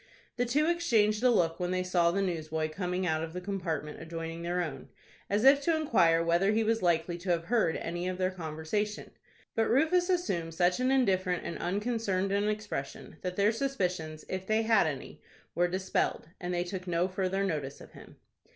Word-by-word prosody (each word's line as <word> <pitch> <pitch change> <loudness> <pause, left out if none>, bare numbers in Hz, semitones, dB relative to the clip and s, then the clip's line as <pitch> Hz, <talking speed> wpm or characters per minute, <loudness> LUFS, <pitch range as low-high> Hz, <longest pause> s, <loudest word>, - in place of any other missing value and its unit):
The 245 0 0
two 290 +6 +2
exchanged 230 -11 +2
a 250 - +5
look 170 -8 +2
when 180 -1 -1
they 185 0 0
saw 175 -2 +2
the 195 +3 0
newsboy 160 -3 -2
coming 180 +2 -2
out 160 -2 0
of 165 0 -6
the 180 - -3
compartment 180 -6 -4
adjoining 165 0 -6
their 175 +1 -1
own, 135 -5 -7 0.4
as 205 +2 +1
if 275 +1 +7
to 330 +3 +2
inquire 170 - +3
whether 170 +4 +3
he 225 +1 +2
was 225 +1 +1
likely 175 0 +1
to 180 +2 -6
have 170 -1 +2
heard 205 -4 +1
any 175 +2 -3
of 185 0 -2
their 185 0 0
conversation. 175 +5 -3 0.4
But 225 -1 +1
Rufus 335 +8 +3
assumed 175 - -1
such 180 +3 +2
an 255 0 +2
indifferent 185 -9 +2
and 170 - -4
unconcerned 195 0 -1
an 200 +1 +1
expression, 210 -10 -5
that 180 0 -3
their 205 +2 +3
suspicions, 180 - -2
if 185 0 -4
they 220 +1 +2
had 220 -6 +4
any, 140 -4 -6 0.3
were 175 +2 +2
dispelled, 185 -3 -1
and 180 -1 -4
they 175 0 0
took 185 +1 -6
no 175 +1 +1
further 190 +1 -1
notice 150 -8 -3
of - - -13
him. - - -14
185 Hz, 195 wpm, -30 LUFS, 170-215 Hz, 0.4 s, if